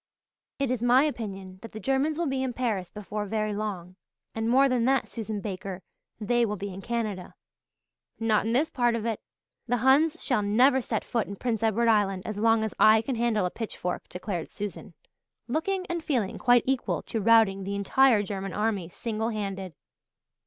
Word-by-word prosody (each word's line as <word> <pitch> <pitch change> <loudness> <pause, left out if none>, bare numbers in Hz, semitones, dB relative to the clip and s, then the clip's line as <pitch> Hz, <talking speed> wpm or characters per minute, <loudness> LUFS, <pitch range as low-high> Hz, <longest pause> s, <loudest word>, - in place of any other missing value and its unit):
"It 275 -3 0
is 250 -3 -1
my 245 +3 +5
opinion 195 -9 -4
that 230 - -10
the 215 - -6
Germans 270 +6 0
will 340 - 0
be 270 -3 -1
in 260 -2 -2
Paris 215 -8 -2
before 210 +1 -5
very 215 0 -1
long 190 -4 -5 0.4
and 225 0 -1
more 270 +3 +5
than 250 -3 +1
that, 265 0 +2
Susan 215 -2 -5
Baker, 190 -2 -6 0.4
they 240 +2 +1
will 210 -2 0
be 200 0 -6
in 190 - -8
Canada." 215 -5 -3 0.8
"Not 220 -1 +2
in 225 - 0
this 290 +6 +2
part 240 -2 +2
of 230 -1 -3
it. 225 -2 -2 0.5
The 245 +1 +1
Huns 295 +4 +4
shall 250 -5 +1
never 250 +6 +4
set - - -3
foot 230 -2 -1
in 200 - -6
Prince 225 0 -2
Edward 225 +1 +2
Island 200 -4 +2
as 215 -1 -4
long 225 0 +3
as 220 - -3
I 220 +1 +6
can 270 - -2
handle 230 -4 +1
a 180 - -2
pitchfork," 195 -5 -5
declared 180 -2 -4
Susan, 205 -2 -7 0.5
looking, 365 +8 -1
and 340 -2 -3
feeling 245 -11 -1
quite 245 -1 +4
equal 265 -1 -1
to 225 - -3
routing 215 -3 +4
the 200 +1 -3
entire 215 +2 +4
German 195 -1 -5
army 210 -5 -1
single 220 +3 -3
handed. 195 -5 -4
220 Hz, 190 wpm, -27 LUFS, 200-245 Hz, 0.8 s, I